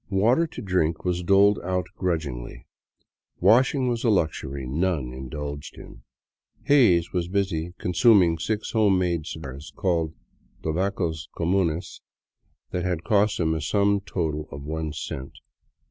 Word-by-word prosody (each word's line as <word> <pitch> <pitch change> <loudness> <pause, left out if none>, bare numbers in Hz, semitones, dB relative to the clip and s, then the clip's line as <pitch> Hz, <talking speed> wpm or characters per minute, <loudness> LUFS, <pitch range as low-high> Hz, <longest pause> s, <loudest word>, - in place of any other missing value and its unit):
Water 115 +12 +3
to - - -9
drink 90 -4 0
was 90 -1 0
doled 100 +3 +4
out 90 -1 -1
grudgingly; 80 -10 -3 0.7
washing 125 +7 +4
was 120 -2 -1
a 120 - +3
luxury 70 - -1
none 75 -2 -1
indulged 70 +3 -6
in. - - -12 0.6
Hays 100 - +4
was 90 -2 -1
busy 90 -3 -2
consuming 90 -3 +4
six 110 +5 -2
home 105 -5 +3
made 85 -3 -1
cigars, 70 -3 -8
called 85 -4 0 0.2
" - - -34
tobacos 80 -2 -1
comunes," 85 0 -1 0.7
that 90 - -2
had 90 -2 -2
cost 105 -1 +2
him 80 -2 +1
a 80 - -2
sum 100 +5 +2
total 80 -5 -3
of 70 0 -8
one 80 +1 -3
cent. 65 -2 -6
85 Hz, 135 wpm, -25 LUFS, 80-100 Hz, 0.7 s, doled